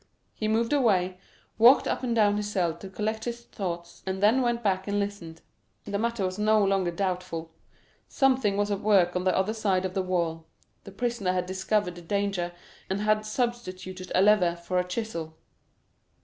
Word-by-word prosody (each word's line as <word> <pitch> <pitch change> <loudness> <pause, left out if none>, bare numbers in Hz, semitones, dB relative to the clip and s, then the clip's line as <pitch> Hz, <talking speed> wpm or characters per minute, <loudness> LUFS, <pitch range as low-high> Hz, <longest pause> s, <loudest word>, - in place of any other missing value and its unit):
He 215 - -3
moved 230 +4 +1
away, 185 -9 +2 0.4
walked 245 +5 +7
up - - -1
and 240 -2 -1
down 205 -2 +3
his 210 0 -2
cell 175 -5 +1
to 190 +3 -10
collect 220 +3 -3
his 235 0 -4
thoughts, 170 -5 -6
and 190 0 -2
then 220 +6 +4
went 240 -1 0
back 190 -2 0
and 200 0 0
listened. 190 -5 -5 0.4
The 200 0 -2
matter 235 -3 -1
was 185 +2 -3
no 215 -1 +4
longer 195 -2 +1
doubtful. 180 -2 -3 0.6
Something 260 -7 +2
was 205 0 0
at 200 - -1
work 195 -4 +3
on 180 +1 -1
the 185 - +2
other 190 +3 +1
side 195 -4 0
of 185 - -3
the 190 - 0
wall; 170 -3 -2 0.4
the 195 - -9
prisoner 225 -3 -1
had 180 -1 -1
discovered 190 +1 -1
the 175 - -11
danger, 195 -1 -1 0.4
and 195 +2 -1
had 215 0 +1
substituted 185 -6 -4
a 185 - +5
lever 195 -5 +4
for 175 +1 -2
a - - +1
chisel. 175 -6 -4
195 Hz, 185 wpm, -27 LUFS, 180-215 Hz, 0.6 s, walked